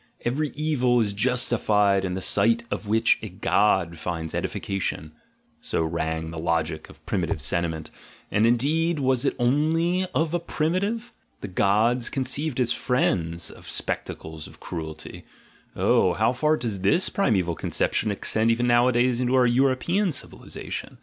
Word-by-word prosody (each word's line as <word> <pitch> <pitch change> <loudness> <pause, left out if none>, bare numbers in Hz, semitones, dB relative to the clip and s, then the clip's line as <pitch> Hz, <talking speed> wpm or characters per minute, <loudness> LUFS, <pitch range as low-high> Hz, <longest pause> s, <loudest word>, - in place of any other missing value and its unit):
"Every 145 +5 0
evil 135 -5 +1
is 105 -3 +1
justified 105 -4 +2
in 90 -1 -2
the 95 - -4
sight 115 +5 +3
of 105 - -4
which 110 +2 +3
a 110 - -6
god 90 -3 +1
finds 80 -1 -4
edification," 95 -5 -3 0.5
so - - -1
rang 80 0 -2
the 85 - -6
logic 80 -1 -1
of - - -17
primitive - - -1
sentiment 80 -2 -2 0.2
— - - -26
and, 105 +2 +3
indeed, 155 +8 +1
was 130 -1 +1
it - - +1
only 165 +8 +1
of 160 0 +1
primitive? 200 +9 -1 0.3
The 100 - -5
gods 110 +6 +2
conceived 135 +1 -1
as 125 -2 +2
friends 85 -10 0
of - - -12
spectacles 80 -1 -4
of - - -16
cruelty 80 -2 -6 0.3
— - - -32
oh, - - +3
how 110 +4 +2
far 150 +4 +2
does 110 -5 -3
this 100 - +2
primeval 95 - +1
conception 105 +6 -1
ex 100 - -3
tend 110 +1 +2
even 115 +1 +2
nowadays 120 0 +3
into 125 +1 +1
our 130 -1 +5
European 135 +10 +2
civilisation! 140 - -6
115 Hz, 150 wpm, -25 LUFS, 90-130 Hz, 0.5 s, our